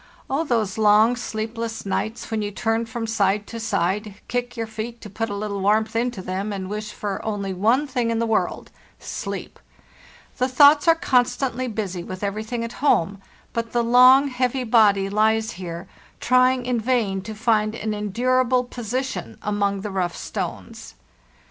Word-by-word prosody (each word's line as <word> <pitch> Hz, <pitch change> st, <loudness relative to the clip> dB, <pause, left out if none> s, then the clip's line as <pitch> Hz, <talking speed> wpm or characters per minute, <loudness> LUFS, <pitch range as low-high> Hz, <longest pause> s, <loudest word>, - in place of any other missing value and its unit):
Oh, 280 Hz, +4 st, +1 dB
those 220 Hz, -8 st, -1 dB
long 215 Hz, +3 st, +5 dB
sleepless 225 Hz, 0 st, -4 dB
nights 220 Hz, +3 st, -3 dB
when 220 Hz, -1 st, 0 dB
you 205 Hz, -, -2 dB
turn 225 Hz, +2 st, -1 dB
from 230 Hz, 0 st, -4 dB
side 210 Hz, -2 st, +1 dB
to 230 Hz, -, -7 dB
side, 205 Hz, -1 st, -1 dB
kick 245 Hz, 0 st, -3 dB
your 225 Hz, -, -2 dB
feet 220 Hz, +2 st, -6 dB
to 210 Hz, -, -10 dB
put 225 Hz, +2 st, -3 dB
a 205 Hz, -, -3 dB
little 200 Hz, -1 st, -3 dB
warmth 215 Hz, +3 st, +2 dB
into 235 Hz, -4 st, -1 dB
them, 190 Hz, +3 st, -3 dB
and 190 Hz, -1 st, -5 dB
wish 210 Hz, 0 st, -4 dB
for 200 Hz, -2 st, -4 dB
only 200 Hz, -3 st, -3 dB
one 225 Hz, +10 st, +2 dB
thing 250 Hz, -4 st, -1 dB
in 230 Hz, -, 0 dB
the 230 Hz, -, +1 dB
world—sleep! 225 Hz, -1 st, -4 dB, 0.8 s
The 255 Hz, -, +2 dB
thoughts 290 Hz, +4 st, +6 dB
are 330 Hz, -, +7 dB
constantly 255 Hz, -4 st, +1 dB
busy 200 Hz, -6 st, -4 dB
with 185 Hz, +2 st, -7 dB
everything 220 Hz, +4 st, -3 dB
at 230 Hz, -, -5 dB
home, 200 Hz, -, +2 dB, 0.3 s
but 230 Hz, -1 st, -3 dB
the 240 Hz, -1 st, +2 dB
long, 255 Hz, +4 st, +6 dB
heavy 255 Hz, 0 st, -1 dB
body 215 Hz, -4 st, +4 dB
lies 220 Hz, +2 st, +1 dB
here 175 Hz, 0 st, -7 dB, 0.3 s
trying 255 Hz, 0 st, +3 dB
in 245 Hz, -1 st, 0 dB
vain 220 Hz, -5 st, 0 dB
to 215 Hz, +3 st, -7 dB
find 215 Hz, -1 st, +1 dB
an 220 Hz, -1 st, -3 dB
endur 235 Hz, +5 st, +1 dB
able 250 Hz, 0 st, +2 dB
position 250 Hz, +2 st, -4 dB
among 200 Hz, -1 st, 0 dB
the 210 Hz, 0 st, -5 dB
rough 180 Hz, -2 st, -2 dB
stones. -, -, -6 dB
220 Hz, 165 wpm, -23 LUFS, 205-245 Hz, 0.8 s, are